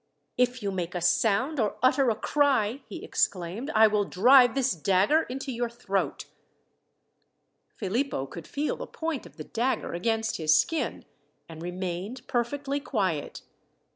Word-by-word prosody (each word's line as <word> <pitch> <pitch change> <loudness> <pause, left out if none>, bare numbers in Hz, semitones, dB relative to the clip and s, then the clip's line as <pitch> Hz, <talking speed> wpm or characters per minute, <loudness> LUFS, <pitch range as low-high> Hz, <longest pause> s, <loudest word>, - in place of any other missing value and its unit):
"If 250 -1 +1
you 200 - -1
make 180 -2 -4
a - - 0
sound, 240 - +2
or 215 -3 0
utter 260 0 +4
a 225 - +1
cry," 270 -2 +1
he 215 - -8
exclaimed, 195 - -1
"I 220 +1 +7
will 210 -1 +2
drive 245 +6 +5
this 265 -1 +2
dagger 195 - +2
into 270 +2 -4
your 240 -1 -2
throat." 200 -5 -2 1.5
Philippo 220 - -1
could 160 +3 -10
feel 290 +1 -2
the - - -6
point 320 -4 -4
of - - -20
the - - -6
dagger 245 +3 -2
against 225 +5 -1
his 155 -2 +4
skin, 325 -1 -2 0.4
and 160 -1 -10
remained 185 +6 -5
perfectly 270 +3 -1
quiet. 190 - -2
225 Hz, 145 wpm, -27 LUFS, 190-265 Hz, 1.5 s, I